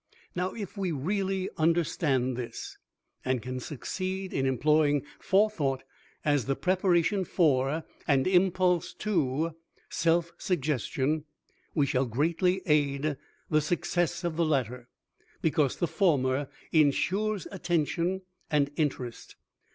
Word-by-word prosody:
Now, 180 +1 -1
if 205 -3 -6
we 190 -3 -1
really 190 +5 -1
understand 155 -6 +1
this 120 -1 -6 0.4
and 130 -1 +1
can 130 +3 -5
succeed 185 +8 -4
in 135 0 +1
employing 145 +2 +3
Forethought 180 -10 +2 0.4
as 145 -4 +2
the 135 - 0
preparation 185 +1 +2
for, 150 -3 +2 0.2
and 135 -3 +3
impulse 180 -1 +2
to, 160 -5 0 0.4
Self 170 +1 +2
Suggestion, 150 - 0 0.5
we 145 -4 +3
shall 130 -1 +1
greatly 170 - +1
aid 145 -1 +2 0.4
the 155 0 +4
success 175 +2 0
of 170 -2 -2
the 170 - +3
latter, 125 -5 -1 0.5
because 150 -4 +2
the - - 0
former 140 -8 +1 0.2
insures 185 +7 +2
attention 175 0 0 0.3
and 145 -2 +2
interest. 130 -6 -3
155 Hz, 110 wpm, -29 LUFS, 135-180 Hz, 0.5 s, the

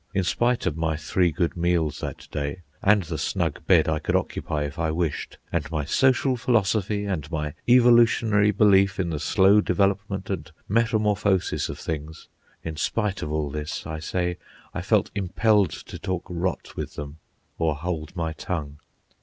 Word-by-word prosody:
In 95 - +2
spite 120 +7 +1
of 90 -5 0
my 80 -1 0
three 85 +4 +1
good 85 +1 -1
meals 85 -4 0
that - - -6
day, 75 +5 -4 0.2
and 105 0 +4
the 80 - -5
snug - - -2
bed - - +5
I 80 -1 +1
could - - -1
occupy 75 -1 -1
if 70 0 -6
I 80 -1 +1
wished, 80 -1 -2
and - - -1
my 75 -3 -2
social 130 - +3
philosophy, 105 -3 +1
and 85 -7 -3
my 75 -3 -3 0.2
evolutionary 115 -4 +5
belief 100 -2 +4
in 90 -3 0
the 75 - -2
slow 95 +7 +4
development 100 0 0
and 80 -5 -4 0.2
metamorphosis 105 -4 +1
of - - -5
things—in 80 +1 -8
spite 105 +4 -1
of 75 - -4
all 75 -2 -1
this, 75 +1 -5
I 80 0 -5
say, 90 +2 -2 0.3
I - - -3
felt - - +1
impelled 100 0 +2
to - - -9
talk 95 -2 -3
rot 90 +1 -3
with - - -5
them 75 +2 -7 0.4
or 80 -2 +1
hold 80 +1 -4
my 80 -2 -2
tongue. 75 -4 -5
90 Hz, 165 wpm, -25 LUFS, 80-100 Hz, 0.4 s, bed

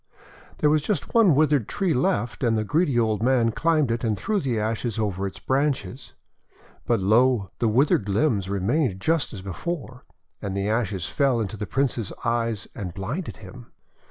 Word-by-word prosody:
There 150 - +3
was 155 0 +3
just 165 -1 -2
one 215 -10 +5
withered 145 -6 +3
tree 190 -5 0
left, 120 -2 0
and 115 -2 +2
the 110 - 0
greedy 150 - +1
old 110 -3 +1
man 120 -2 +3
climbed 155 -1 +1
it, 115 +1 -2
and 110 -3 0
threw 215 -2 -1
the 125 - -1
ashes 110 +1 -2
over 100 -3 -1
its 95 - -8
branches. 135 -1 -2 0.7
But, 120 -2 +2
lo! 110 0 +3
the 115 - +2
withered 115 -3 +2
limbs 100 -3 +1
remained 100 - 0
just 160 +5 0
as 95 -5 -8
before, 125 - -5 0.4
and 100 -1 -3
the 100 +1 -1
ashes 105 -5 -1
fell 135 -4 +1
into 110 -2 -3
the 105 -1 -5
Prince's 125 -6 -1
eyes 115 -2 -1
and 90 -6 -6
blinded 120 - -4
him. 120 +6 -11
120 Hz, 175 wpm, -24 LUFS, 105-140 Hz, 0.7 s, one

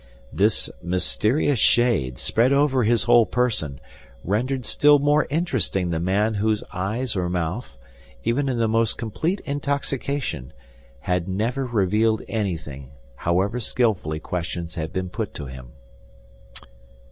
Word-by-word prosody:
This - - +3
mysterious 110 - +1
shade, 105 - +3
spread 120 +4 +2
over 140 -2 +3
his 115 -2 +2
whole 120 +1 +5
person, 105 - -1 0.4
rendered 125 +6 -1
still 145 +5 +5
more 145 +1 +2
interesting 140 - 0
the 80 - -1
man 100 +5 +1
whose 105 +1 0
eyes 110 +7 -2
or 90 -2 -1
mouth, 90 - -3 0.5
even 135 +4 0
in 125 - -1
the 115 -1 +2
most 115 0 +1
complete 160 - -2
intoxication, 140 - -3 0.5
had 90 -1 -1
never 115 +8 -1
revealed 110 0 +1
anything, 80 - -4 0.3
however 95 - 0
skillfully 105 -10 0
questions 85 0 -4
had 80 -2 -4
been 95 -1 -3
put - - -5
to 70 - -6
him. 65 -1 -9
110 Hz, 125 wpm, -23 LUFS, 90-125 Hz, 0.5 s, whole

